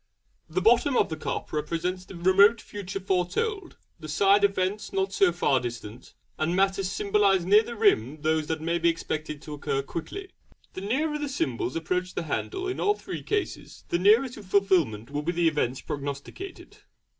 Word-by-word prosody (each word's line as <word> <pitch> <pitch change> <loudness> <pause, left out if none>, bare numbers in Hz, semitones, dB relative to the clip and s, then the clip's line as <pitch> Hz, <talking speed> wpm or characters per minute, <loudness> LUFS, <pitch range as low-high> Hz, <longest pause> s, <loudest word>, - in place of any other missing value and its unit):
'The 175 +4 -1
bottom 240 +6 +4
of - - +3
the 160 - -3
cup 155 - -5
represents 170 +4 -2
the 190 - -11
remoter 195 +6 +4
future 195 -2 -6
foretold; 200 - -1 0.2
the 155 - -8
side 200 +6 +4
events 200 +1 0
not 195 0 -1
so 195 -2 +4
far 145 -6 +2
distant; 120 -1 -8 0.2
and 160 +3 0
matters 195 0 +1
symbolised 195 -2 +2
near 205 +3 +6
the 235 +1 -7
rim 155 - +2
those 155 -1 +1
that 160 -1 -2
may 170 +1 0
be 170 0 +3
expected 155 -2 -4
to 150 - -7
occur 140 -2 -2
quickly. 380 - -6 0.4
The 185 - -6
nearer 300 +9 -1
the 295 -1 -3
symbols 130 - -2
approach 180 +3 -2
the - - -2
handle 375 - -3
in 380 - -3
all 415 0 +2
three - - -7
cases 415 -2 -3
the 170 - +1
nearer 215 +8 +5
to 230 - -10
fulfilment 185 - +1
will 145 0 -2
be 170 +4 -2
the 170 -1 +2
events 135 -5 0
prognosticated. 145 - -7
185 Hz, 180 wpm, -27 LUFS, 155-205 Hz, 0.4 s, near